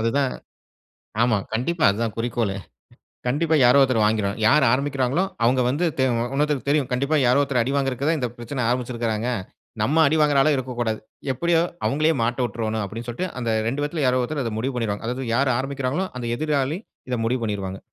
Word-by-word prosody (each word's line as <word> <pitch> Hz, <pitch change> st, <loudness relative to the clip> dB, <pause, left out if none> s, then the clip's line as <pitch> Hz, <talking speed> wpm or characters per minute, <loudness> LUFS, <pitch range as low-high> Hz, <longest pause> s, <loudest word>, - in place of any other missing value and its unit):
அதுதான். 130 Hz, +4 st, +1 dB, 0.9 s
ஆமா. 120 Hz, -2 st, +3 dB, 0.2 s
கண்டிப்பா, 155 Hz, +8 st, 0 dB
அது 100 Hz, -, -3 dB
தான் 110 Hz, -, -3 dB
குறிக்கோளே! 115 Hz, -4 st, -1 dB, 0.7 s
கண்டிப்பா 160 Hz, +5 st, +1 dB
யாரோ 125 Hz, +3 st, +6 dB
ஒருத்தர் 130 Hz, -5 st, +3 dB
வாங்கிருவாங்க. 105 Hz, -1 st, 0 dB
யாரு 145 Hz, 0 st, +5 dB
ஆரம்பிக்கிறாங்களோ! 135 Hz, +4 st, +1 dB, 0.2 s
அவுங்க 125 Hz, +2 st, +3 dB
வந்து 145 Hz, +7 st, 0 dB
தெ -, -, +4 dB
அ -, -, 0 dB, 0.2 s
இன்னொருத்தருக்கு 145 Hz, -2 st, 0 dB
தெரியும். 145 Hz, -3 st, +2 dB
கண்டிப்பா 140 Hz, +5 st, +1 dB
யாரோ 125 Hz, +3 st, +4 dB
ஒருத்தர் 135 Hz, -3 st, +1 dB
அடி 130 Hz, -, -2 dB
வாங்குறதுக்கு 135 Hz, 0 st, -1 dB
தான் 160 Hz, -1 st, +1 dB
இந்த 125 Hz, -2 st, -1 dB
பிரச்சன 120 Hz, +1 st, -3 dB
ஆரம்பிச்சிருக்குறாங்க. 120 Hz, -2 st, -1 dB, 0.5 s
நம்ம 140 Hz, +9 st, +1 dB
அடிவாங்குற 150 Hz, -1 st, +3 dB
ஆளா 155 Hz, -, +4 dB
இருக்கக்கூடாது. 120 Hz, -4 st, -2 dB, 0.3 s
எப்பிடியோ 165 Hz, +5 st, +2 dB, 0.2 s
அவுங்களே 155 Hz, +3 st, +2 dB
மாட்ட 120 Hz, +3 st, -1 dB
விட்ரோன்னு 110 Hz, -1 st, -2 dB
அப்பிடின்னு 115 Hz, +4 st, -6 dB
சொல்ட்டு 120 Hz, +10 st, -3 dB
அந்த 120 Hz, -2 st, -2 dB, 0.2 s
2 145 Hz, +5 st, -2 dB
யாரோ 125 Hz, 0 st, +2 dB
ஒருத்தரு 140 Hz, +1 st, -2 dB
அத 115 Hz, -, -3 dB
முடிவு 130 Hz, +3 st, -2 dB
பண்ணிருவாங்க. 115 Hz, -3 st, -2 dB
அதாவது 125 Hz, +2 st, -3 dB
யாரு 135 Hz, +1 st, +2 dB
ஆரம்பிக்கிறாங்களோ! 135 Hz, +5 st, -2 dB
அந்த 120 Hz, -, -5 dB
எதிராளி 150 Hz, 0 st, 0 dB, 0.3 s
இத 125 Hz, -, 0 dB
முடிவு 125 Hz, +2 st, 0 dB
பண்ணிருவாங்க. 95 Hz, -3 st, -3 dB
125 Hz, 175 wpm, -23 LUFS, 115-140 Hz, 0.9 s, யாரோ